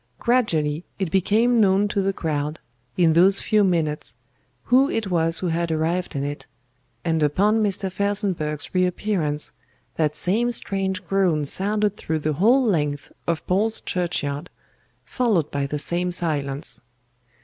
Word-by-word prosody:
Gradually 165 Hz, -11 st, +1 dB
it 190 Hz, -5 st, -2 dB
became 220 Hz, +6 st, +3 dB
known 200 Hz, 0 st, +3 dB
to 200 Hz, -, 0 dB
the 195 Hz, 0 st, +1 dB
crowd, 150 Hz, -4 st, -2 dB, 0.4 s
in 165 Hz, -3 st, +4 dB
those 190 Hz, +4 st, +5 dB
few 215 Hz, -2 st, +2 dB
minutes, 155 Hz, -, -1 dB, 0.5 s
who 265 Hz, +3 st, +4 dB
it 215 Hz, -4 st, -2 dB
was 165 Hz, -1 st, +1 dB
who 180 Hz, -, -1 dB
had 170 Hz, 0 st, -1 dB
arrived 165 Hz, +3 st, -1 dB
in 140 Hz, -, -1 dB
it, 145 Hz, +1 st, -5 dB, 0.6 s
and 165 Hz, -1 st, +1 dB
upon 200 Hz, +9 st, +2 dB
Mr. 195 Hz, -2 st, 0 dB
FELSENBURGH'S 190 Hz, -7 st, -2 dB
reappearance 180 Hz, -4 st, 0 dB, 0.5 s
that 150 Hz, -2 st, +1 dB
same 225 Hz, +9 st, +1 dB
strange 195 Hz, -4 st, -3 dB
groan 180 Hz, -6 st, +1 dB
sounded 205 Hz, +5 st, 0 dB
through 160 Hz, -, -2 dB
the 155 Hz, 0 st, -1 dB
whole 235 Hz, -, +4 dB
length 150 Hz, -8 st, -1 dB, 0.2 s
of 170 Hz, -2 st, -1 dB
Paul's 215 Hz, +5 st, +1 dB
Churchyard, 165 Hz, -3 st, -2 dB, 0.6 s
followed 210 Hz, -, 0 dB
by 140 Hz, -1 st, -1 dB
the 150 Hz, -, -3 dB
same 175 Hz, +4 st, 0 dB
silence. 145 Hz, -5 st, -3 dB
180 Hz, 140 wpm, -23 LUFS, 155-200 Hz, 0.6 s, those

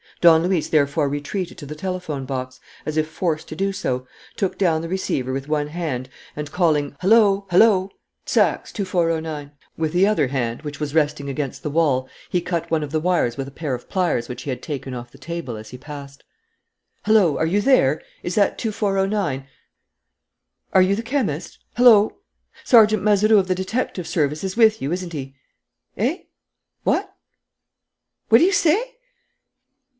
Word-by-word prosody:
Don 165 Hz, -1 st, +6 dB
Luis 180 Hz, -3 st, 0 dB
therefore 145 Hz, -1 st, +2 dB
retreated 145 Hz, +6 st, -4 dB
to 145 Hz, -, -8 dB
the 150 Hz, +2 st, -7 dB
telephone 175 Hz, -5 st, -4 dB
box, 130 Hz, -1 st, -5 dB, 0.3 s
as 155 Hz, -, -2 dB
if 155 Hz, 0 st, +1 dB
forced 160 Hz, -1 st, -2 dB
to -, -, -6 dB
do 195 Hz, +4 st, 0 dB
so, 130 Hz, -9 st, -3 dB, 0.3 s
took 195 Hz, -, -2 dB
down 165 Hz, -5 st, +2 dB
the 165 Hz, -, -6 dB
receiver 140 Hz, -8 st, -2 dB
with 135 Hz, +1 st, -4 dB
one 150 Hz, -1 st, 0 dB
hand, 150 Hz, -6 st, -4 dB, 0.3 s
and, 150 Hz, -1 st, -5 dB
calling, 150 Hz, -5 st, +1 dB
"Hullo! 200 Hz, -1 st, +4 dB
Hullo! 190 Hz, 0 st, +4 dB, 0.4 s
Saxe, -, -, +1 dB
2409," 165 Hz, -6 st, -2 dB, 0.3 s
with 160 Hz, -1 st, -1 dB
the 180 Hz, +2 st, +4 dB
other 210 Hz, -9 st, +2 dB
hand, 120 Hz, -2 st, -2 dB
which 150 Hz, -2 st, -7 dB
was 150 Hz, -1 st, -3 dB
resting 150 Hz, -2 st, 0 dB
against 140 Hz, -1 st, -4 dB
the 150 Hz, -, -4 dB
wall, 140 Hz, -5 st, +1 dB, 0.2 s
he 180 Hz, -, +1 dB
cut 170 Hz, -1 st, -3 dB
one 160 Hz, -2 st, +1 dB
of 145 Hz, -, -6 dB
the 155 Hz, -, +1 dB
wires 170 Hz, -8 st, +1 dB
with 135 Hz, -1 st, -4 dB
a -, -, -9 dB
pair 145 Hz, -1 st, -4 dB
of 125 Hz, -, -6 dB
pliers 175 Hz, -11 st, 0 dB
which 125 Hz, +1 st, -6 dB
he -, -, -6 dB
had 125 Hz, -1 st, -5 dB
taken 135 Hz, -3 st, -5 dB
off 120 Hz, -1 st, -7 dB
the -, -, -16 dB
table 165 Hz, -3 st, -5 dB
as 110 Hz, 0 st, -9 dB
he 125 Hz, -, -9 dB
passed. 140 Hz, 0 st, -10 dB, 0.8 s
"Hullo! 210 Hz, -8 st, +4 dB
Are 160 Hz, -, +1 dB
you 200 Hz, +5 st, +1 dB
there? 180 Hz, -, +3 dB, 0.2 s
Is 175 Hz, -, -3 dB
that 205 Hz, -2 st, +2 dB
2409? 195 Hz, -, -1 dB, 1.3 s
Are 190 Hz, -, +6 dB
you 195 Hz, +2 st, +2 dB
the 225 Hz, -, -4 dB
chemist?... 215 Hz, -, -2 dB, 0.2 s
Hullo!... 225 Hz, -4 st, +6 dB, 0.5 s
Sergeant 215 Hz, -4 st, +5 dB
Mazeroux 210 Hz, +1 st, +5 dB
of 190 Hz, -, -1 dB
the 185 Hz, -, +1 dB
detective 190 Hz, -1 st, -3 dB
service 150 Hz, -1 st, -1 dB
is 190 Hz, +2 st, -4 dB
with 220 Hz, -2 st, +4 dB
you, 140 Hz, -, -2 dB
isn't 180 Hz, -1 st, -3 dB
he? 135 Hz, -2 st, -6 dB, 0.6 s
Eh? 270 Hz, -, -1 dB, 0.6 s
What? -, -, 0 dB, 1.1 s
What 225 Hz, -, +8 dB
do -, -, +4 dB
you 375 Hz, -, +4 dB
say? 455 Hz, +11 st, +1 dB
165 Hz, 175 wpm, -22 LUFS, 140-195 Hz, 1.3 s, What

